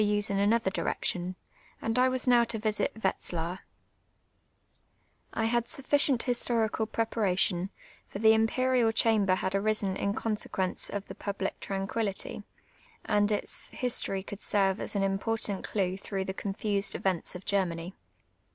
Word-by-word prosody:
se 205 -1 +3
in 195 - +1
another 205 0 +3
direction, 180 -1 -1 0.4
and 225 +2 0
I 255 +1 +5
was 255 -1 -1
now 245 -2 +6
to 230 - -3
visit 215 -1 0
Wetzlar. 175 -1 -1 1.7
I 225 - 0
had 235 +1 +1
sufficient 275 -2 +2
historicid 235 -3 +1 0.2
j)reparation; 195 -5 0 0.4
for - - -6
tlie 220 +1 +6
Imperial 235 +1 +3
Chandwr 215 -4 +3
had 190 0 -2
arisen 200 -1 +1
in 200 +1 -1
consequence 210 -4 -2
of 205 -1 -4
tlie - - -10
jiublic 200 -1 -2
trancpiillity, 195 +1 -2 0.6
and 205 -1 +2
its 210 - -2
history 210 -6 -1
could 205 +1 -8
serve 195 -1 +2
as - - -4
an 200 - +2
important 200 +1 -1
clue 190 -3 -1
through 195 -1 -3
the 190 - -3
confused 200 +1 -1
events 185 -2 -1
of 180 - -8
Germany. 180 -3 0
205 Hz, 140 wpm, -29 LUFS, 195-225 Hz, 1.7 s, now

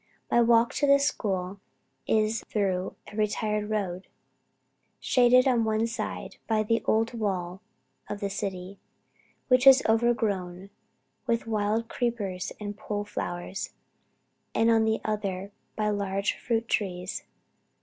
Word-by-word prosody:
My 240 - +5
walk 235 0 +4
to 285 - +2
this 280 0 +5
school 195 -7 -2 0.5
is 215 0 +1
through 190 -3 -1
a 205 - -12
retired 210 0 -1
road, 195 -4 -2 0.9
shaded 250 +1 +4
on 245 -3 +3
one 220 0 +1
side 230 -1 -5
by 220 -1 +2
the 230 +2 +1
old 225 +2 +2
wall 190 -4 -3 0.5
of 205 - -4
the 200 - -1
city, 195 -1 -5 0.7
which 255 +1 +4
is 270 0 +9
overgrown 205 -5 0 0.6
with 230 -1 0
wild 220 +1 0
creepers 210 -8 -2
and 205 -1 -5
pole 205 0 -3
flowers, 180 -1 -5 0.8
and 225 +1 +4
on 225 -1 +4
the 220 0 +1
other 200 -2 -2 0.2
by 210 -1 0
large 200 0 -1
fruit 230 -1 -2
trees. 180 -4 -2
215 Hz, 130 wpm, -27 LUFS, 195-230 Hz, 0.9 s, is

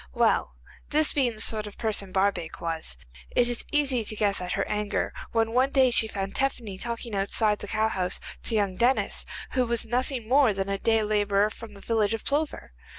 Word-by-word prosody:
Well, - - +2 0.3
this 310 +1 +2
being 250 -5 +1
the - - -12
sort 215 -2 +3
of 205 - -11
person 210 -4 -1
Barbaik 190 -4 0
was, 165 - -3 0.4
it 245 - +4
is 240 -1 -2
easy 275 -5 +2
to 215 - -3
guess 205 -3 +1
at 180 0 -3
her - - -1
anger 210 0 -2 0.2
when 225 -1 +1
one 255 +3 +3
day 265 -2 +4
she 225 -2 +3
found 195 -2 -4
Tephany 235 -8 -2
talking 235 0 -4
outside 205 +2 +2
the - - -7
cowhouse 215 -4 0 0.3
to 230 - +1
young 200 -3 0
Denis, 250 +3 +1 0.2
who 255 - +2
was 235 -1 -1
nothing 250 0 -2
more 255 -4 +4
than 195 0 -2
a 195 0 -1
day 225 0 +2
labourer 205 0 +2
from 220 -2 -11
the 200 - -12
village 220 -1 +1
of 225 - -9
Plover. 290 - -2
220 Hz, 200 wpm, -26 LUFS, 200-240 Hz, 0.4 s, it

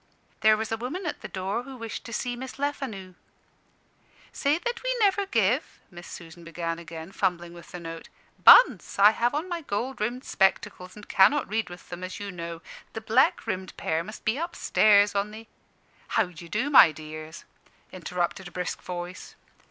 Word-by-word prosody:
"There 215 0 +5
was 220 +1 -4
a 225 - 0
woman 280 - -5
at 305 - -4
the - - -6
door 190 +4 -3
who 265 +1 -10
wished 230 -2 -7
to - - -8
see 245 +2 -2
Miss 260 +2 -8
Lefanu." 265 -10 -4 1.2
"Say 290 +2 +1
that 470 +7 -4
we - - -1
never 400 -2 +2
give 230 - 0
" - - -37
Miss 175 -1 -11
Susan 170 0 -11
began 165 0 -4
again, 165 +1 -9
fumbling 175 -3 -1
with 170 -1 -13
the 180 - -7
note. 165 -1 -8 0.3
"Bunce, - - +7
I 205 +2 +8
have 240 +4 0
on 310 +5 -2
my 345 -2 -4
gold 245 -1 -4
rimmed 240 +4 -2
spectacles, 185 -1 0
and 210 -1 -12
cannot 255 +9 +4
read 220 -1 -2
with 175 -1 -12
them, 175 +1 -7
as 185 0 -6
you 200 -1 -5
know. 170 -1 -7 0.3
The 225 - -5
black 220 0 +2
rimmed 185 0 -4
pair 160 +1 -1
must 215 +5 -10
be 220 +6 +1
up 340 +1 -4
stairs, 205 -1 +4
on 200 +1 0
the 220 +2 -10 0.4
" - - -33
"How 225 - +4
d'ye 170 -2 -11
do, 240 - -1
my 180 - +9
dears?" 155 +1 -9 0.5
interrupted 180 0 -3
a - - -11
brisk 180 0 -4
voice. 180 +1 -7
205 Hz, 190 wpm, -26 LUFS, 175-250 Hz, 1.2 s, my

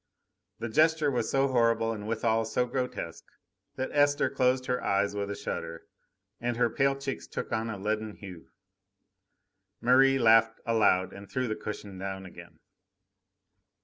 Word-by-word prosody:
The 115 - -4
gesture 155 +4 +3
was 120 -4 -1
so 135 0 +2
horrible 115 -2 +2
and 105 -1 -7
withal 115 0 +1
so 125 +3 0
grotesque, 125 -10 -4 0.5
that 130 - -3
Esther 145 0 +2
closed 130 -1 +1
her 125 -1 -1
eyes 100 +1 +1
with 100 0 -3
a 100 - -3
shudder, 85 -3 -5 0.6
and 120 0 -2
her 120 -1 +2
pale 135 0 +2
cheeks 135 -1 -5
took - - -5
on 115 0 -1
a 110 - -4
leaden 105 +1 -3
hue. 90 -4 -11 1.3
Merri 135 +2 +5
laughed 115 -2 +4
aloud 105 -5 +2
and 100 0 -11
threw 130 -1 -1
the 110 - -2
cushion 100 -3 -7
down 95 0 -5
again. 90 - -13
115 Hz, 150 wpm, -29 LUFS, 105-130 Hz, 1.3 s, Merri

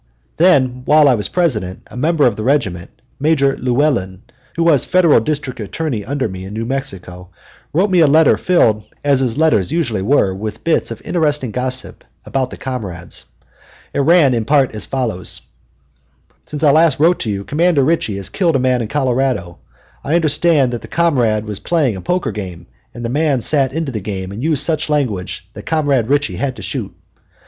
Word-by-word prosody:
Then, 130 -8 +3
while 150 0 +5
I 135 - +5
was 105 -4 0
President, 110 - -1
a - - -14
member 150 +3 +2
of 120 -4 +2
the 110 - -5
regiment, 110 -9 0 0.3
Major 140 -2 +2
Llewellyn, 120 -8 0 0.3
who 170 - 0
was 155 -6 +4
Federal 175 -7 +4
District 140 +1 -3
Attorney 115 +2 -3
under 135 +3 -2
me 95 -2 -7
in 100 +2 -8
New 115 +1 -3
Mexico, 90 -8 -5 0.4
wrote 190 +6 +1
me 180 - +4
a 160 - +6
letter 155 +3 +5
filled, 110 -12 +2 0.2
as 140 -2 +3
his 130 -2 -1
letters 150 - +2
usually 120 - -1
were, 100 -3 +2
with 105 +3 -6
bits 165 - +1
of 115 -1 -8
interesting 150 -7 0
gossip 130 +2 -4 0.2
about 130 -2 -1
the - - -9
comrades. 100 -10 -6 0.7
It - - -1
ran 150 -2 +4
in 115 -2 0
part 140 -2 +2
as 105 - -3
follows: 115 -9 -2 1.1
"Since 150 0 -6
I 145 - +6
last 160 +1 +3
wrote 170 +4 +3
you 100 -2 -2
Comrade 170 +2 +1
Ritchie 140 -7 +1
has 100 - -5
killed 170 -6 0
a - - +3
man 125 -1 +1
in 115 - -3
Colorado. 130 - -1 0.4
I 150 - 0
understand 155 -4 +2
that 120 - -4
the - - -10
comrade 120 -11 +1
was 105 -2 -5
playing 150 - 0
a 95 - -7
poker 180 - -1
game, 95 -4 -7 0.3
and 120 0 -7
the - - -2
man 145 0 +1
sat 135 0 +1
into 155 -1 -3
the 110 - -3
game 95 -2 -5
and 105 +4 -7
used 150 -1 0
such 155 0 -1
language 125 -12 -2
that - - -11
Comrade 145 -7 +1
Ritchie 145 +1 0
had 135 -2 -2
to - - -10
shoot. - - -4
130 Hz, 190 wpm, -17 LUFS, 110-155 Hz, 1.1 s, a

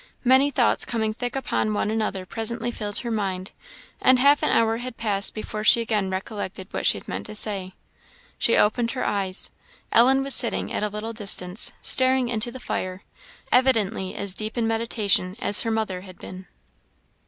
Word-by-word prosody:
Many 260 +3 +4
thoughts 285 - +2
coming 220 -2 -2
thick 245 +3 -5
upon 215 -5 -2
one 210 - -1
another 215 -4 -3
presently 235 +3 -4
filled 210 -3 -5
her 235 - -3
mind, 195 -3 -3 0.5
and 255 0 +5
half 285 +3 +4
an - - +1
hour 225 0 +2
had 245 0 -8
passed 205 -3 +1
before 215 0 -5
she 225 - +6
again 215 -4 -1
recollected 190 0 -6
what - - -1
she - - +4
had - - -12
meant - - -5
to 215 - -8
say. 195 -3 0 0.6
She - - +3
opened 230 +2 +1
her 255 - -3
eyes; 195 -2 0 0.4
Ellen 265 +4 +4
was 275 0 0
sitting 235 - +2
at - - -2
a 210 - 0
little 210 +2 -6
distance, 200 -3 +2
staring 260 -1 +4
into 240 +1 -3
the 260 - -9
fire 185 -5 -5 0.5
evidently 225 -7 +1
as 200 -2 -1
deep 215 +4 -3
in 235 - 0
meditation 225 -5 0
as 205 - +5
her 230 - -3
mother 220 -5 -2
had 185 -1 -13
been. 185 0 -11
220 Hz, 180 wpm, -23 LUFS, 200-235 Hz, 0.6 s, she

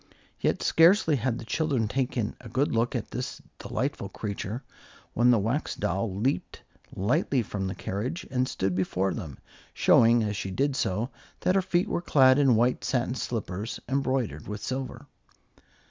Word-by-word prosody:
Yet - - 0
scarcely 165 -2 +5
had 120 0 -1
the 115 - -8
children 135 -4 0
taken 125 -2 -1
a 120 - -10
good 130 +6 0
look 115 +1 +1
at - - -3
this - - -4 0.2
delightful - - -3
creature, 105 +4 -5 0.5
when 120 +2 +4
the 120 - +6
Wax 115 +9 -1
Doll 95 +2 -1
leaped 125 +8 -2 0.3
lightly 120 +5 +1
from 100 -2 -3
the 95 - -4
carriage 125 - -4
and 130 0 +1
stood 95 0 -1
before 95 0 0
them, 75 -6 -6 0.4
showing, 115 0 +5
as 105 -1 -2
she 95 - -3
did 135 +8 0
so, 110 +3 -1 0.3
that 185 - +2
her 195 - +3
feet 180 -1 +1
were - - -1
clad 130 -5 +5
in 135 -4 +5
white 120 +3 +2
satin 125 -2 0
slippers, 110 -4 -4
embroidered 130 - -1
with 105 0 -5
silver. 130 0 -4
120 Hz, 160 wpm, -27 LUFS, 105-135 Hz, 0.5 s, the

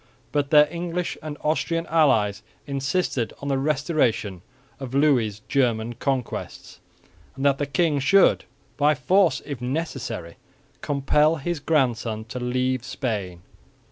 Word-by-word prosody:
But 145 -1 0
their 150 0 +7
English 175 0 -3
and 155 -1 -6
Austrian 165 +2 0
allies 115 - +2 0.2
insisted 140 -2 -1
on 140 - -5
the 135 -1 +1
restoration 135 - 0 0.4
of 135 -1 -6
Louis' 125 -8 +2
German 120 -4 +1
conquests, 130 +1 -4 0.6
and 135 +1 -3
that 140 -1 +3
the 145 - -1
king 145 +2 +1
should, 185 +9 +4 0.3
by 150 +1 +3
force 180 +8 +2
if 140 -5 -6
necessary, 125 - -4 0.4
compel 150 +3 +2
his 165 +2 -3
grandson 120 -8 0
to 125 - -5
leave 125 0 -1
Spain. 105 - -4
135 Hz, 125 wpm, -24 LUFS, 120-150 Hz, 0.6 s, their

